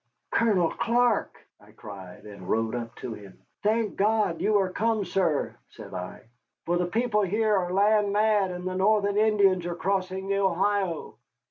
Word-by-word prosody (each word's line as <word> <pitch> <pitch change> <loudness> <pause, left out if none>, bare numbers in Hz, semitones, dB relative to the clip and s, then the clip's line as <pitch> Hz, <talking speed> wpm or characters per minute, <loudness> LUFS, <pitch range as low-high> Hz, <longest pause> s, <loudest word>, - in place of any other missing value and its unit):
"Colonel 200 -8 +2
Clark!" 235 -1 +1 0.2
I - - -20
cried, 95 -3 -11
and 100 -3 -10
rode 115 0 0
up 120 -1 -5
to 115 - -6
him. 100 -3 -12 0.2
"Thank 215 0 0
God 205 -5 +1
you 210 +2 +3
are 190 -2 0
come, 220 0 0
sir," 170 -7 0
said - - -12
I, - - -6 0.4
"for 175 +1 +1
the 175 0 0
people 220 +3 0
here 210 +2 +1
are 180 -2 -1
land 205 +1 +3
mad, 210 -2 +2
and 180 0 -5
the 185 - -3
Northern 200 +1 +2
Indians 200 -5 +3
are 175 - -3
crossing 190 +1 -2
the 200 0 0
Ohio." 190 - 0
195 Hz, 165 wpm, -26 LUFS, 175-210 Hz, 0.4 s, you